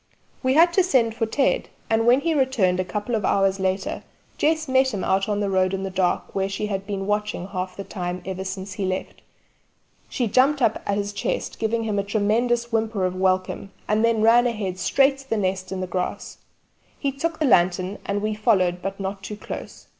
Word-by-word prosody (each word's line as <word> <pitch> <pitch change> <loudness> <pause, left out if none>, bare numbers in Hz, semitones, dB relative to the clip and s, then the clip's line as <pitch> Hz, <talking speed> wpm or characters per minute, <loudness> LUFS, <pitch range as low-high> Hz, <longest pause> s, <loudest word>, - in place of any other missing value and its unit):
We 260 0 +2
had 340 +2 +6
to 380 - +4
send 250 -10 +2
for 225 0 -1
Ted, 270 +5 +1 0.2
and 225 +1 +1
when 250 +3 +5
he 330 +2 +1
returned 250 -11 +2
a - - +2
couple 210 +5 -4
of 220 -2 0
hours 195 0 +2
later 190 0 -1 0.4
Jess 315 0 +1
met 260 -2 +3
him 190 - -3
out 195 +2 +1
on 205 0 0
the 205 - 0
road 185 0 +2
in 190 - -4
the 195 - -3
dark 185 -1 0
where 195 0 0
she 195 +2 -3
had 195 -1 -3
been 195 -2 -3
watching 210 -2 -2
half 185 -1 -4
the 195 - -4
time 180 -2 -5
ever 190 0 -4
since 190 0 -5
he 195 +1 -3
left. 185 0 -4 0.9
She 245 - -1
jumped 270 +6 +3
up 225 -4 +1
at 200 - +1
his 205 0 -2
chest - - -3
giving 225 0 0
a 215 - -1
long 200 -1 -1
tremulous 235 +3 +1
whimper 220 -3 0
of 185 0 -2
welcome, 185 +1 0
and 215 +1 +2
then 230 -2 +2
ran 240 +2 +6
ahead 200 -6 -3
straight 275 +7 +3
to 270 0 -14
the 225 - +1
nest 185 -1 -2
in 190 -1 -3
the - - -1
grass. 180 0 -4 0.6
He 280 - -1
took 320 +4 -3
a 310 - +2
lantern 185 -3 +2
and 205 +1 -2
we 215 0 0
followed, 190 -5 +2
but 195 +1 -4
not 195 0 -4
too 205 +2 -7
close. - - -8
205 Hz, 215 wpm, -23 LUFS, 190-235 Hz, 0.9 s, had